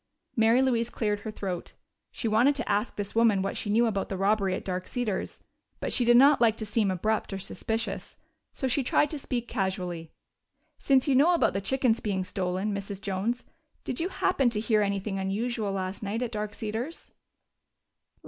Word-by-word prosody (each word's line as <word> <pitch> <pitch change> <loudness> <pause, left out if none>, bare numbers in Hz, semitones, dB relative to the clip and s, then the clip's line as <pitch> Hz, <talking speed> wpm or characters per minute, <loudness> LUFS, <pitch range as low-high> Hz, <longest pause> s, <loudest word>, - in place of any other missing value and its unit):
Mary 230 +3 +4
Louise 235 -3 +1
cleared 210 -3 -1
her 220 - -6
throat. 190 -4 -5 0.4
She 230 - -4
wanted 240 +7 +4
to - - -3
ask 210 +4 0
this 205 -1 -4
woman 220 -4 +3
what 195 - -2
she 205 - -3
knew 230 +3 +4
about 205 -4 -1
the 195 - -3
robbery 195 -1 +2
at - - -6
Dark 185 -1 -3
Cedars, 240 -6 -3 0.4
but - - -2
she 250 - +2
did 240 0 +6
not 280 +2 +6
like 225 -2 +5
to 220 - -5
seem 210 -1 +1
abrupt 210 +5 -1
or - - -2
suspicious. 220 +4 -4 0.3
So 265 - -2
she 260 +3 +1
tried 285 +3 +2
to 305 - -4
speak 240 -3 -3
casually. 180 -4 -3 0.7
"Since 270 -1 +3
you 280 - +3
know 305 +7 +5
about - - +2
the 195 - -1
chickens 245 +2 +1
being 195 -3 -1
stolen, 185 +2 -2
Mrs. 200 0 -5
Jones, 200 +6 -2 0.4
did - - -3
you 345 +3 -1
happen 325 -9 +2
to 220 -3 -2
hear 215 -1 +2
anything 200 0 -1
unusual 210 +2 -1
last 190 0 -3
night 215 +4 -2
at 240 - -3
Dark 210 -1 -4
Cedars?" 225 +9 -5
215 Hz, 190 wpm, -28 LUFS, 195-240 Hz, 0.7 s, did